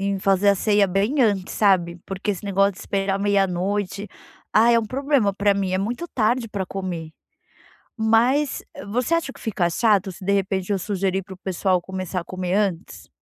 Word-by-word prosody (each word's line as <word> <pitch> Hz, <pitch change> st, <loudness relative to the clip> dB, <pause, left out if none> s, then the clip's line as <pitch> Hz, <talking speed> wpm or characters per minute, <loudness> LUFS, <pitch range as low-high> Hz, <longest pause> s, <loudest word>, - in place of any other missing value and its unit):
em 195 Hz, -, -5 dB
fazer 195 Hz, +1 st, +3 dB
a 200 Hz, -, +4 dB
ceia 205 Hz, 0 st, +3 dB
bem 205 Hz, +10 st, +1 dB
antes, 200 Hz, -5 st, +1 dB
sabe. 180 Hz, -4 st, +2 dB
Porque 195 Hz, +2 st, -3 dB
esse 195 Hz, -, -6 dB
negócio 195 Hz, 0 st, +2 dB
de -, -, -15 dB
esperar 195 Hz, 0 st, -1 dB
meia 200 Hz, -1 st, +2 dB
noite. 195 Hz, +3 st, -2 dB, 0.5 s
Ah, 230 Hz, +2 st, +5 dB
é 235 Hz, -, +5 dB
um 225 Hz, -, -4 dB
problema 265 Hz, -4 st, +1 dB
pra 200 Hz, 0 st, +2 dB
mim, 195 Hz, -2 st, -1 dB
é 185 Hz, -, +1 dB
muito 240 Hz, -, -3 dB
tarde 235 Hz, 0 st, +1 dB
pra 195 Hz, -3 st, -3 dB
comer. 180 Hz, -4 st, -5 dB, 0.9 s
Mas, 240 Hz, +6 st, +2 dB, 0.3 s
você 250 Hz, +7 st, 0 dB
acha 335 Hz, -5 st, 0 dB
que -, -, -16 dB
fica 180 Hz, -6 st, 0 dB
chato 200 Hz, 0 st, +2 dB
se, 185 Hz, -, -12 dB
de 200 Hz, -, +1 dB
repente, 195 Hz, 0 st, -1 dB
eu 195 Hz, -, +1 dB
sugerir 190 Hz, 0 st, -1 dB
para 190 Hz, 0 st, -10 dB
o -, -, -13 dB
pessoal 185 Hz, -1 st, 0 dB
começar 185 Hz, 0 st, -4 dB
a -, -, -10 dB
comer 185 Hz, -1 st, -3 dB
antes? 195 Hz, -4 st, -2 dB
195 Hz, 195 wpm, -23 LUFS, 185-215 Hz, 0.9 s, Ah